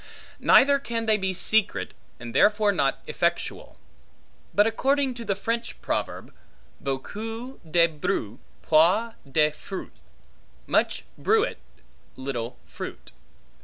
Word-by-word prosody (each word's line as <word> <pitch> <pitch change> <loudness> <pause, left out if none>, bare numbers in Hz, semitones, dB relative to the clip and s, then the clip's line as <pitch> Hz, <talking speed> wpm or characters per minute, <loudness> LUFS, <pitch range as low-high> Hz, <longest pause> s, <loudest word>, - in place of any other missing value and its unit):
Neither 280 +1 +6
can 230 -4 -3
they 220 -1 +4
be 190 -2 -1
secret, 220 +3 +1 0.3
and 120 -1 -8
therefore 210 +7 +4
not 140 -8 0
effectual; - - -2 0.7
but 205 - +4
according 270 +4 +1
to 235 -1 -7
the 200 -3 -1
French 230 +4 -3
proverb, - - -3 0.5
Beaucoup 225 - -5
de 170 +1 +5
bruit, 140 -8 -3 0.2
peu 180 +9 +4 0.2
de 150 +1 +4
fruit; 185 +5 -8 0.7
Much - - +1
bruit 445 +3 +2 0.6
little 130 -3 -4
fruit. - - -8
205 Hz, 110 wpm, -26 LUFS, 155-230 Hz, 0.7 s, Neither